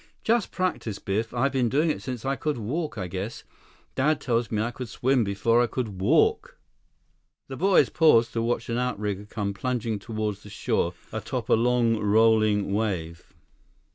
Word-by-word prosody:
"Just 230 -1 +1
practice, 180 - -2
Biff. 110 +4 -2
I've 130 +3 +1
been 130 -3 +1
doing 155 +5 +2
it - - -5
since 125 -3 -6
I 135 +1 0
could 150 0 -2
walk, 125 +4 -3
I 95 - -3
guess. 95 +5 -5 0.5
Dad 150 +3 +1
tells 115 -3 0
me 105 - -1
I 115 +3 -1
could 125 -1 -7
swim 130 +3 +1
before 110 +4 +2
I 120 - +2
could 110 -6 -4
walk." 440 - +2 0.9
The - - -5
boys 195 -1 +4
paused 120 -9 +4
to 115 - -1
watch 115 0 -1
an 120 +1 -1
outrigger 105 -5 -2
come 100 -2 -3
plunging 115 0 -2
toward 110 -1 -3
the 105 0 -14
shore 90 -2 -1 0.2
atop 110 +2 -4
a - - +5
long, 120 0 +3
rolling 110 -1 +3
wave. 90 -6 -3
115 Hz, 170 wpm, -26 LUFS, 105-130 Hz, 0.9 s, a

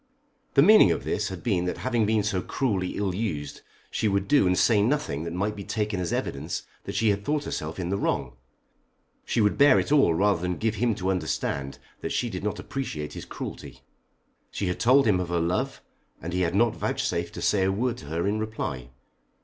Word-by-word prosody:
The 140 - +7
meaning 215 +5 +8
of - - 0
this - - -1
had 95 -3 -7
been 95 -7 +1
that 90 - -2
having 120 -4 0
been 110 -1 +2
so 100 -3 0
cruelly 100 -8 -1
ill 100 -2 -1
used 85 -9 -4 0.3
she 110 - 0
would 100 -1 0
do 140 -9 +4
and 90 0 +2
say 110 -4 +4
nothing 105 - 0
that 85 - -4
might 100 +5 -1
be 100 - -7
taken 105 -1 -2
as 90 -2 -2
evidence 75 +5 -3 0.2
that - - -5
she 110 - +3
had 100 0 -2
thought 150 +4 0
herself 80 - -4
in 90 -1 -3
the 100 +1 -1
wrong. 65 -3 -1 0.9
She 115 - +1
would 105 +5 +2
bear 140 -2 +7
it - - -2
all 140 - +5
rather 100 -1 +2
than 90 0 -2
give 110 -1 0
him 120 -3 +2
to 95 -2 -1
understand 75 -6 -2 0.2
that - - -4
she 120 - -1
did 95 -1 -5
not 105 - -2
appreciate 75 - -5
his - - -7
cruelty. - - -8 0.7
She 100 - -3
had 90 -1 -2
told 130 +4 +5
him 100 -5 +3
of 90 -2 -3
her 85 0 +1
love, 85 +2 -1 0.4
and 85 - -6
he 90 - 0
had 85 0 0
not 115 +2 +3
vouchsafed - - -2
to - - -6
say 100 -2 +3
a 95 - +2
word 120 +4 -1
to 75 - -11
her 80 +3 -2
in 105 +2 0
reply. 85 - -4
100 Hz, 220 wpm, -26 LUFS, 90-110 Hz, 0.9 s, meaning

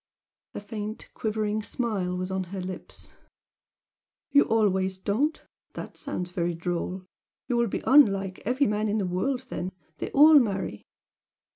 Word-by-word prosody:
A - - -3
faint, 210 +1 -6
quivering 215 -1 -1
smile 205 -6 -2
was 185 +1 -3
on 190 -1 -1
her 190 +2 -6
lips. 185 0 -7 1.2
"You 285 - +6
always 190 -4 +1
don't? 240 +12 0 0.3
That - - -7
sounds 180 0 -5
very 175 -1 -1
droll! 175 +2 -3 0.4
You 245 - 0
will 235 0 +3
be - - -3
unlike 195 -9 +4
every 255 +6 +2
man 210 -1 0
in 210 - +1
the 200 - 0
world, 245 +9 -1
then, 180 +1 -4 0.3
they - - -3
all 300 +1 +8
marry!" 195 - -2
205 Hz, 145 wpm, -27 LUFS, 185-230 Hz, 1.2 s, all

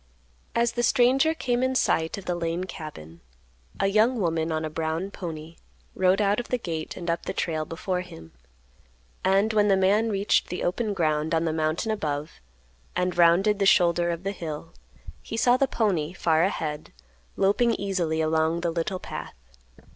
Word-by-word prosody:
As 235 0 +2
the 240 0 -2
stranger 260 +6 +3
came 245 -5 -1
in 260 0 0
sight 165 -9 +1
of 195 - -9
the 180 - -1
Lane 170 +1 -2
cabin, 155 - -9 0.6
a 195 - +2
young 220 +5 +3
woman 165 -3 0
on 160 0 -1
a - - -3
brown 160 +4 -2
pony 165 -3 -7 0.4
rode 185 +1 +2
out 205 +1 +2
of 240 - -5
the 250 - 0
gate 165 -8 -5
and 175 -2 -7
up 170 0 -2
the - - -2
trail 155 -2 -2
before 180 +2 -3
him; 80 - -12 0.9
and 195 +3 +3
when 210 -1 +3
the 195 -1 +4
man 205 +4 +3
reached 200 -1 +1
the 180 - -4
open 205 +3 -1
ground 155 -2 0
on 165 +1 +1
the 160 - 0
mountain 160 +7 -1
above, 150 - -4 0.5
and 180 0 0
rounded 190 +5 +4
the 195 - +3
shoulder 175 -2 +4
of 170 +1 -3
the 195 - -1
hill, 165 -4 -7 0.5
he 225 - -6
saw 245 +1 +4
the 270 +1 +2
pony, 180 - 0
far 165 -3 +2
ahead, 155 -6 -3 0.4
loping 225 +4 +2
easily 175 -5 -1
along 160 +1 +1
the 170 -1 0
little 170 +3 -2
path. - - -7
180 Hz, 175 wpm, -26 LUFS, 160-205 Hz, 0.9 s, the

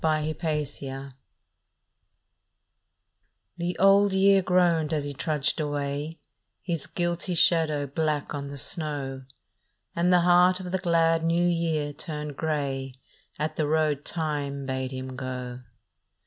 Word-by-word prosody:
BLOOD 155 0 0
ROAD 140 -3 -3 2.4
THE 175 +1 -3
Old 195 +1 +5
Year 195 0 +5
groaned 175 -4 +2
as 150 - -1
he 145 0 -4
trudged 150 +2 -1
away, 145 +1 -3 0.5
His 170 -5 -3
guilty 175 +1 -2
shadow 155 -4 +4
black 150 +1 -2
on 140 -1 -4
the 140 0 -7
snow, 140 -3 -2 0.7
And 175 +1 +2
the 180 -1 +5
heart 180 +1 +5
of 180 -1 -6
the 190 - 0
glad 165 -2 +2
New 170 +1 +2
Year 165 -4 0
turned 150 -3 -6
grey 135 -4 -2 0.4
At 155 +1 -3
the 155 - +1
road 155 -2 +1
Time 145 -4 -2
bade 130 -1 -2
him 130 0 -6
go. 125 -1 -5
155 Hz, 125 wpm, -26 LUFS, 140-170 Hz, 2.4 s, Old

